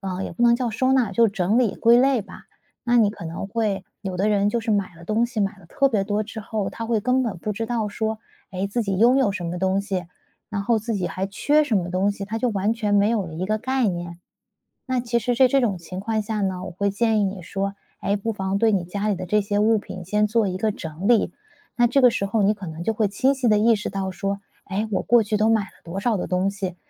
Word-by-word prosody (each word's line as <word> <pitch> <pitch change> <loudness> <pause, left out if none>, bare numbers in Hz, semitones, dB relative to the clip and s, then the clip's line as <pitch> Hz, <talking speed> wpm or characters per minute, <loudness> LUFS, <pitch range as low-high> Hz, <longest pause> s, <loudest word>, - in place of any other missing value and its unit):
呃， 190 -1 -4
也 - - -6
不 240 - -3
能 235 0 +6
叫 245 -2 -1
收 255 +4 +1
纳， 250 -6 +2
就 235 -1 +4
是 - - -9
整 200 +3 +1
理 230 -5 +1
归 235 +1 +5
类 260 -3 +3
吧。 - - -13 0.4
那 240 0 +2
你 215 -3 +5
可 190 -5 -10
能 170 +4 -5
会 200 -3 -1 0.2
有 190 -2 -4
的 200 +4 +1
人 205 0 +2
就 235 +3 0
是 225 -1 -3
买 200 -4 0
了 170 - -13
东 215 +6 +1
西， 240 -2 -6
买 195 -2 0
了 - - -17
特 275 +10 +2
别 215 -6 +1
多 205 +2 -1
之 220 +1 -7
后， 210 -2 -3
他 230 - -6
会 230 -1 +1
根 255 +4 +1
本 230 -7 -2
不 210 +5 -3
知 225 +3 -3
道 225 -2 -1
说， 220 +1 -2 0.3
诶， 190 +2 -2
自 230 +4 -1
己 195 -3 -1
拥 240 +4 +5
有 220 -7 +3
什 190 -3 -5
么 175 +1 -3
东 190 +1 +1
西， 190 -4 -3 0.4
然 200 -1 -3
后 230 +1 +2
自 225 +2 -3
己 185 -3 -1
还 190 +1 -3
缺 290 +10 +2
什 245 -8 +1
么 175 -2 -1
东 190 +3 +1
西， 200 -1 -5
他 220 +3 -4
就 250 - +1
完 205 -1 0
全 215 -3 -2
没 205 +1 +4
有 215 -5 0
了 160 - -8
一 175 - -3
个 215 +1 0
概 260 0 0
念。 175 -2 -4 0.7
那 255 -1 0
其 235 0 0
实 245 +3 0
在 260 - +6
这 275 +2 +3
种 220 -6 +1
情 180 +2 -7
况 220 +1 -1
下 210 0 -3
呢， 185 -2 -2
我 - - -6
会 200 +3 -1
建 220 +1 +1
议 - - +2
你 190 -2 -3
说， 195 +3 -3 0.2
哎， 200 - 0
不 225 +3 -2
妨 195 -1 -2
对 225 0 +3
你 190 -4 +1
家 200 +4 -3
里 205 - +2
的 185 +1 -5
这 210 +4 +2
些 205 0 -1
物 220 +2 +4
品 185 -3 -8
先 210 +4 +1
做 215 -1 +1
一 185 - -3
个 215 +2 0
整 160 +1 -6
理。 235 -3 +3 0.4
那 240 0 +4
这 260 +4 +3
个 250 - +8
时 200 - -1
候 205 +1 +1
你 205 +2 +3
可 200 -3 -9
能 160 0 -6
就 225 - +1
会 215 -1 +2
清 260 +7 +2
晰 260 -3 0
地 210 -1 +4
意 225 +2 +4
识 210 - -3
到 195 -1 -3
说： 195 +1 -3 0.2
“哎， 205 +3 -2
我 - - +1
过 240 -1 +4
去 210 0 -1
都 215 +1 +2
买 220 -2 +3
了 190 - -9 0.2
多 170 +3 -5
少 225 +1 +1
的 185 - -3
东 185 +2 +1
西。 190 -3 -5
210 Hz, 305 characters per minute, -23 LUFS, 195-230 Hz, 0.7 s, 个